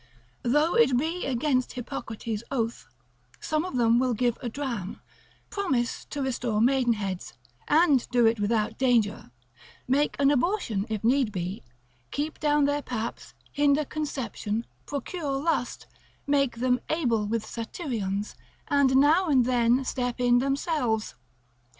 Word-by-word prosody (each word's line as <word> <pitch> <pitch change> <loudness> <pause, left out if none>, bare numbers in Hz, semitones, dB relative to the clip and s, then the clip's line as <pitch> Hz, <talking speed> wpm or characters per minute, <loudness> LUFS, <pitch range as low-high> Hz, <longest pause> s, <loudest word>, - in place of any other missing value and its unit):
Though 295 +7 +2
it 245 +2 +4
be 325 +6 -1
against 255 0 0
Hippocrates' 225 -3 -5
oath, 235 -4 -2 0.5
some 310 0 -1
of 365 -8 -4
them 235 0 +4
will 255 -2 +1
give 240 +1 +1
a 245 - -3
dram, 230 -7 -4 0.5
promise 265 - -1
to 285 -2 -4
restore 240 -4 -1
maidenheads, 230 -7 +1 0.3
and 295 -4 +4
do 245 -1 +3
it 225 0 +3
without 210 +1 0
danger, 235 - +1 0.6
make 280 +3 +2
an 280 0 +4
abortion 250 - 0
if 215 -1 -3
need 250 -1 +3
be, 185 0 -4 0.5
keep 300 +2 -3
down 295 -1 +3
their 285 +1 0
paps, 235 -4 -5 0.2
hinder 290 +1 +2
conception, 245 -7 -3 0.2
procure 285 0 -3
lust, 300 -5 -1 0.4
make 275 -3 +1
them 250 +1 +1
able 235 -10 +1
with 220 0 -1
Satyrions, 220 - -4 0.4
and 280 -3 +3
now 310 +7 +5
and 265 -5 +4
then 245 +1 +2
step 245 -1 -2
in 245 0 +4
themselves. 270 -4 -1
250 Hz, 130 wpm, -27 LUFS, 230-285 Hz, 0.6 s, now